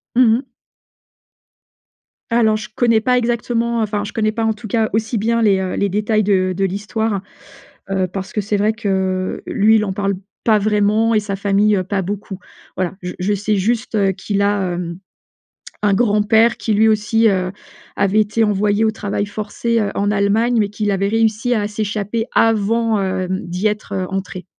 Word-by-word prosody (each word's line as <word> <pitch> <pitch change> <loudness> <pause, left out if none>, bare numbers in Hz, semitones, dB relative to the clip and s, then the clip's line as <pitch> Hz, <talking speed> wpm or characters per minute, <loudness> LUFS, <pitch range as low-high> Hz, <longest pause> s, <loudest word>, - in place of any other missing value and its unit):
Mmh 250 0 +5
mh. 265 - -7 1.9
Alors 220 -2 +3
je 215 - -8
connais 230 -3 +3
pas 250 +2 +2
exactement, 235 0 -1
heu, - - +2
enfin, 210 -1 -2
je 205 - -6
connais 215 -1 0
pas 225 +1 -3
en 220 - +2
tout 220 +1 -10
cas 220 +1 0
aussi 220 +1 0
bien 230 +2 +1
les, 200 -3 +4
heu, 190 -1 -3
les 200 - 0
détails 215 +2 +1
de 185 -2 +1
de 195 - +1
l'histoire. 205 +2 -2 0.7
Heu, 190 -1 +1
parce 190 +1 -6
que 210 - 0
c'est 205 +1 -1
vrai 215 +2 +1
que, 190 -3 -2
lui 220 - +3
il 215 - +2
en 190 - -3
parle 200 0 -1 0.3
pas 220 -2 +4
vraiment, 210 +2 +2
et 215 - +3
sa 205 -1 -4
famille, 200 +1 +2
heu, 185 - 0
pas 195 +1 -1
beaucoup. 195 0 -5 0.4
Voilà, 185 -1 -2
je 180 0 -6
je 190 +3 0
sais 205 +1 0
juste, 220 +4 -1
heu, 195 -2 +2
qu'il 200 +2 -2
a, 200 -3 +1
hem, 170 0 -5 0.8
un 205 -1 +3
grand-père 220 +1 +3
qui 220 - -2
lui 220 +2 +4
aussi, 220 +1 +2
heu, 185 -2 0 0.4
avait 200 +1 +2
été 215 +2 +1
envoyé 210 0 +2
au 220 - +3
travail 205 -1 -3
forcé, 215 +3 -2
heu, 205 -2 0
en 205 +1 0
Allemagne, 210 +4 +2
mais 210 -2 +2
qu'il 210 0 -2
avait 195 0 0
réussi 225 +2 +1
à 210 -2 0
s'échapper 210 +1 -2
avant, 225 0 +2
hem, 185 -1 -1
d'y 180 +5 0
être, 210 -1 -5
heu, 190 -1 -2
entré. 185 -2 -5
210 Hz, 190 wpm, -18 LUFS, 195-220 Hz, 1.9 s, Mmh